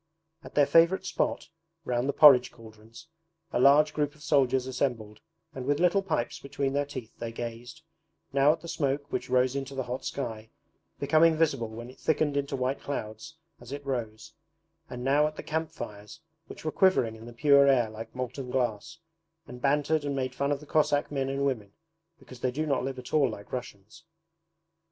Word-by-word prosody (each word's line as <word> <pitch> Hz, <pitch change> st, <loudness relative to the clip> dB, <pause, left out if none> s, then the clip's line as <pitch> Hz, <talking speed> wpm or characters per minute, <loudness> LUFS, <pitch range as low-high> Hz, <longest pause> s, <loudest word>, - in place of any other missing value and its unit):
At -, -, -12 dB
their 145 Hz, -, +5 dB
favourite 170 Hz, +5 st, +4 dB
spot, -, -, -2 dB, 0.4 s
round 125 Hz, +1 st, -1 dB
the -, -, +1 dB
porridge 135 Hz, -5 st, +7 dB
cauldrons, 115 Hz, +4 st, -15 dB, 0.5 s
a -, -, +1 dB
large 145 Hz, +3 st, +5 dB
group 150 Hz, 0 st, -1 dB
of 150 Hz, -, -16 dB
soldiers 135 Hz, -4 st, +2 dB
assembled 120 Hz, -5 st, -3 dB, 0.3 s
and 130 Hz, -, -6 dB
with 145 Hz, +1 st, +1 dB
little 180 Hz, +3 st, +3 dB
pipes 155 Hz, -11 st, -2 dB
between 140 Hz, 0 st, -3 dB
their 145 Hz, 0 st, 0 dB
teeth 130 Hz, -6 st, -8 dB
they 115 Hz, -1 st, -4 dB
gazed, 120 Hz, +7 st, -7 dB, 0.5 s
now 140 Hz, +2 st, +5 dB
at 160 Hz, +1 st, -3 dB
the 170 Hz, -, -9 dB
smoke 145 Hz, -2 st, -2 dB
which -, -, -3 dB
rose 130 Hz, +1 st, +2 dB
into 140 Hz, 0 st, -4 dB
the 135 Hz, -, -2 dB
hot 125 Hz, +1 st, -5 dB
sky, 110 Hz, -5 st, -5 dB, 0.5 s
becoming 155 Hz, +3 st, +4 dB
visible 140 Hz, -8 st, +1 dB
when 120 Hz, +3 st, -9 dB
it -, -, -20 dB
thickened 155 Hz, -2 st, +1 dB
into 140 Hz, -1 st, -1 dB
white 130 Hz, +1 st, -2 dB
clouds 140 Hz, +4 st, -6 dB, 0.2 s
as 120 Hz, +1 st, -12 dB
it 140 Hz, 0 st, -6 dB
rose, 115 Hz, -5 st, -4 dB, 0.6 s
and 125 Hz, 0 st, -6 dB
now 145 Hz, +3 st, +3 dB
at 155 Hz, -, -7 dB
the -, -, -7 dB
camp 160 Hz, 0 st, -2 dB
fires 105 Hz, 0 st, -9 dB, 0.3 s
which -, -, -11 dB
were 155 Hz, -, 0 dB
quivering 140 Hz, -14 st, +3 dB
in 110 Hz, +1 st, -12 dB
the -, -, -9 dB
pure 140 Hz, +3 st, +5 dB
air 125 Hz, -4 st, +4 dB
like 110 Hz, +2 st, -9 dB
molten 125 Hz, +1 st, -5 dB
glass, 125 Hz, +5 st, -2 dB, 0.5 s
and 125 Hz, 0 st, -11 dB
bantered 145 Hz, +2 st, +1 dB
and 140 Hz, -1 st, -2 dB
made 130 Hz, -1 st, -2 dB
fun 140 Hz, +1 st, -1 dB
of 145 Hz, -, 0 dB
the 150 Hz, -, -13 dB
Cossack 145 Hz, -1 st, +1 dB
men 135 Hz, -2 st, -1 dB
and 135 Hz, +1 st, -1 dB
women 110 Hz, -7 st, -2 dB, 0.4 s
because 130 Hz, -5 st, -14 dB
they 130 Hz, -, 0 dB
do 150 Hz, +5 st, -2 dB
not 140 Hz, -4 st, 0 dB
live 135 Hz, 0 st, -4 dB
at 125 Hz, -1 st, -9 dB
all 145 Hz, -4 st, +4 dB
like 100 Hz, -2 st, -9 dB
Russians. 110 Hz, -5 st, -8 dB
135 Hz, 195 wpm, -28 LUFS, 120-145 Hz, 0.6 s, porridge